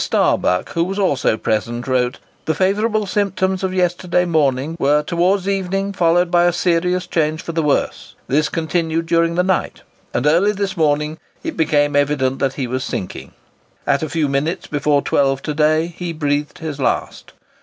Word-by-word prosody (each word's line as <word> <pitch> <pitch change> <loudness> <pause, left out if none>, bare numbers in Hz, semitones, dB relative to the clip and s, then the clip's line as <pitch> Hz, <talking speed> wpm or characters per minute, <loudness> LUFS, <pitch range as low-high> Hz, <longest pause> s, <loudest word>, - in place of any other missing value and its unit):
Starbuck, 90 0 +1
who 170 - 0
was 195 +3 -3
also 145 - +1
present, 120 +4 -2
wrote, 125 0 0 0.3
"The 160 - 0
favourable 210 +4 +1
symptoms 190 -1 -1
of 190 - 0
yesterday 180 -1 +1
morning 150 -2 +1
were 150 +1 +3
towards 180 +4 +1
evening 195 0 -1
followed 175 -1 +2
by 175 0 +4
a 175 - +3
serious 180 +1 +1
change 155 -2 -1
for - - -5
the 165 0 0
worse. 150 -2 -1
This 150 +3 +1
continued 165 0 -1
during 165 0 +2
the 180 - +2
night, 185 0 -1 0.3
and 125 - -1
early 175 +8 +4
this 200 -1 -3
morning 150 -1 0 0.2
it 325 -3 -4
became 145 -2 +2
evident 140 -2 +1
that 135 -1 0
he 135 - -3
was 130 +1 -3
sinking. 95 - -5 0.5
At 140 - +2
a 155 - -3
few 160 -3 0
minutes 150 +6 -1
before 145 -1 +1
12 135 -1 +1
to 150 - -2
day 155 +3 +2
he 175 -2 -4
breathed 145 -1 -2
his 155 -3 -6
last. 130 - -2
160 Hz, 175 wpm, -19 LUFS, 145-180 Hz, 0.5 s, by